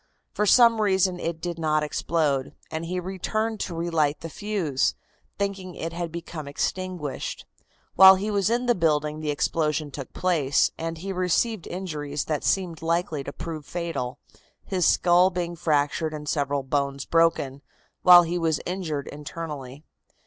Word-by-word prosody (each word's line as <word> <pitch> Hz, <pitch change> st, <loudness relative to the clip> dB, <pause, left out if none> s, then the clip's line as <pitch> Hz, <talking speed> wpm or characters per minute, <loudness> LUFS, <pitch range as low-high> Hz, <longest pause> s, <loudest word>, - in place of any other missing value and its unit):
For 210 Hz, -, 0 dB
some 230 Hz, 0 st, +6 dB
reason 190 Hz, -3 st, +2 dB
it 165 Hz, -1 st, -3 dB
did 170 Hz, 0 st, -4 dB
not 155 Hz, -1 st, +1 dB
explode, 150 Hz, -3 st, -1 dB, 0.2 s
and 160 Hz, +1 st, -3 dB
he 180 Hz, +2 st, -2 dB
returned 215 Hz, +4 st, -2 dB
to 170 Hz, -, -4 dB
relight 165 Hz, -3 st, 0 dB
the 165 Hz, -, -7 dB
fuse, 190 Hz, -11 st, -1 dB, 0.4 s
thinking 195 Hz, -3 st, -3 dB
it 165 Hz, +1 st, -5 dB
had 170 Hz, -1 st, -4 dB
become 165 Hz, -3 st, -7 dB
extinguished. 175 Hz, 0 st, -3 dB, 0.5 s
While 190 Hz, 0 st, +9 dB
he 205 Hz, +3 st, -2 dB
was 200 Hz, -1 st, +1 dB
in 240 Hz, +2 st, 0 dB
the 240 Hz, -, +4 dB
building 150 Hz, -4 st, 0 dB
the 155 Hz, -1 st, -3 dB
explosion 150 Hz, 0 st, 0 dB
took 135 Hz, -2 st, -7 dB
place, 160 Hz, -7 st, +2 dB
and 165 Hz, 0 st, -4 dB
he 195 Hz, +4 st, -5 dB
received 185 Hz, +3 st, 0 dB
injuries 150 Hz, -6 st, -4 dB
that 150 Hz, -3 st, -2 dB
seemed 175 Hz, -5 st, 0 dB
likely 165 Hz, -3 st, -1 dB
to 140 Hz, -, -6 dB
prove 155 Hz, 0 st, -6 dB
fatal, 155 Hz, -7 st, -4 dB, 0.5 s
his 185 Hz, -4 st, +1 dB
skull 180 Hz, +1 st, +5 dB
being 175 Hz, -2 st, -3 dB
fractured 155 Hz, -1 st, 0 dB
and 150 Hz, 0 st, -8 dB
several 145 Hz, -2 st, 0 dB
bones 140 Hz, 0 st, -1 dB
broken, 165 Hz, -5 st, +1 dB, 0.4 s
while 175 Hz, -1 st, +9 dB
he 175 Hz, +1 st, -2 dB
was 160 Hz, -3 st, +1 dB
injured 170 Hz, -6 st, -3 dB
internally. 150 Hz, -2 st, -7 dB
165 Hz, 155 wpm, -25 LUFS, 150-185 Hz, 0.5 s, While